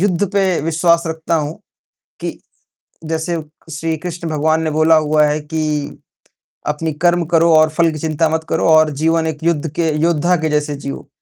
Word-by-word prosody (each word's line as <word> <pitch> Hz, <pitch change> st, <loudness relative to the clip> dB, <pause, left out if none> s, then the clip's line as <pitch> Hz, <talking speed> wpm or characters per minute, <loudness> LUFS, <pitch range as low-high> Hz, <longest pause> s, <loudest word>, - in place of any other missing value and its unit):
युद्ध 195 Hz, 0 st, +1 dB
पे 190 Hz, -3 st, +1 dB
विश्वास 165 Hz, +2 st, +2 dB
रखता 160 Hz, +1 st, -2 dB
हूँ 155 Hz, 0 st, -2 dB, 0.6 s
कि, -, -, -5 dB, 0.7 s
जैसे 160 Hz, +1 st, -2 dB, 0.3 s
श्रीकृष्ण 165 Hz, +2 st, -4 dB
भगवान 155 Hz, +1 st, +1 dB
ने 160 Hz, -, -1 dB
बोला 155 Hz, +1 st, +4 dB
हुआ 155 Hz, -1 st, +3 dB
है 150 Hz, +1 st, 0 dB
कि 150 Hz, -1 st, -3 dB, 0.7 s
अपनी 155 Hz, +2 st, -2 dB
कर्म 175 Hz, 0 st, +3 dB
करो 165 Hz, 0 st, +3 dB
और 155 Hz, 0 st, +6 dB
फल 165 Hz, +1 st, +2 dB
की 155 Hz, -, -6 dB
चिंता 160 Hz, +1 st, 0 dB
मत 160 Hz, 0 st, -2 dB
करो 160 Hz, -, 0 dB
और 155 Hz, -1 st, +5 dB
जीवन 165 Hz, 0 st, +2 dB
एक 160 Hz, -2 st, -3 dB
युद्ध 165 Hz, -2 st, 0 dB
के 165 Hz, -2 st, +1 dB
योद्धा 170 Hz, +1 st, +2 dB
के 160 Hz, -1 st, -1 dB
जैसे 150 Hz, 0 st, 0 dB
जियो। 140 Hz, 0 st, -7 dB
160 Hz, 170 wpm, -17 LUFS, 155-165 Hz, 0.7 s, और